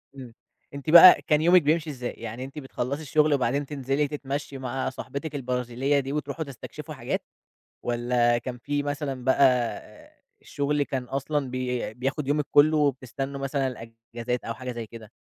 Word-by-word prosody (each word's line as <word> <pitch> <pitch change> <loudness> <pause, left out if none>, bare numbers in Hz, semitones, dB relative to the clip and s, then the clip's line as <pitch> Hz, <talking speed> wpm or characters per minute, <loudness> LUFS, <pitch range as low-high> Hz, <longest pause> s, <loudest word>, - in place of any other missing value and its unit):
إمم. 125 -4 -10 0.4
أنتِ 140 +2 -6
بقى 175 +2 +10
كان 150 0 +3
يومِك 175 +2 +6
بيمشي 155 +2 +1
إزاي؟ 125 -4 -4
يعني 115 +2 -7
أنتِ 135 +3 -7
بتخلّصي 135 +1 -4
الشُغل 155 0 +2
وبعدين 140 +1 0
تنزلي 140 +1 -1
تتمشي 140 -1 -5
مع 130 0 -3
صاحبتِك 140 +3 -6
البرازيلية 125 +1 0
دي 135 0 -4
وتروحوا 150 +2 -3
تستكشفوا 135 -3 -9
حاجات؟ - - -3 0.6
والَّا 120 0 +2
كان 125 +1 -5
في 145 +3 -2
مثلًا 145 -3 -3
بقى 130 -3 +1 0.3
الشُغل 145 0 -1
كان 135 -2 -3
أصلًا 140 +2 -2
بي 125 -3 -3
بياخُد 135 +4 -3
يومِك 145 +1 +1
كلّه 155 +2 +5
وبتستنوا 135 -1 -1
مثلًا 135 0 -1
الإجازات 115 0 -6
أو 115 - -4
حاجة 125 +2 -6
زي 115 -2 -6
كده؟ 110 -1 -12
135 Hz, 155 wpm, -26 LUFS, 125-145 Hz, 0.6 s, بقى